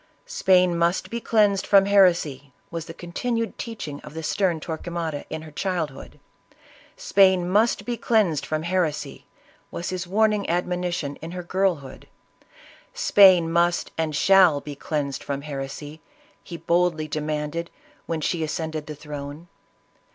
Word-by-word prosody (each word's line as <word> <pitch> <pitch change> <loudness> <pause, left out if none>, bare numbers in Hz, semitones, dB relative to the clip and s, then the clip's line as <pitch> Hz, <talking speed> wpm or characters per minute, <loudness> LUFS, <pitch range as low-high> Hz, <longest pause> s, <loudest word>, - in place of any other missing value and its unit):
Spain 185 - +3
must 170 +2 0
be 235 0 -3
cleansed 205 -4 +2
from 195 -1 +6
heresy! 170 -9 +3 0.2
was 165 -1 -5
the 165 - -8
continued 230 +6 -3
teachings 185 -11 -6
of 150 - -11
the 160 - -5
stern 175 0 0
Tor 160 0 -5
quemada, 165 -4 -4
in 160 0 -5
her 155 - -11
childhood; 160 -5 -4 0.8
Spain 190 - +3
must 210 +6 +2
be 240 -1 -3
cleansed 205 - +1
from 155 0 -3
heresy! 170 -3 -2 0.4
was 175 - -5
his 185 -1 -4
warning 210 +1 +1
admonition 175 -4 -2
in 165 +2 -8
her 180 -1 -5
girl 190 +1 +1
hood; 130 - -12 0.9
Spain 190 - +6
must 170 +1 +1
and 160 -2 -2
shall 185 -2 +5
be 145 0 -8
cleansed 140 -1 -3
from 140 0 -4
heresy! 145 +1 -7 0.4
he 170 - -8
boldly 170 -1 +1
demanded, 150 +2 -3 0.4
when 165 -2 -2
she 165 +2 -1
ascended 155 0 -4
the 150 - -6
throne. 150 +2 -8
170 Hz, 145 wpm, -24 LUFS, 155-190 Hz, 0.9 s, from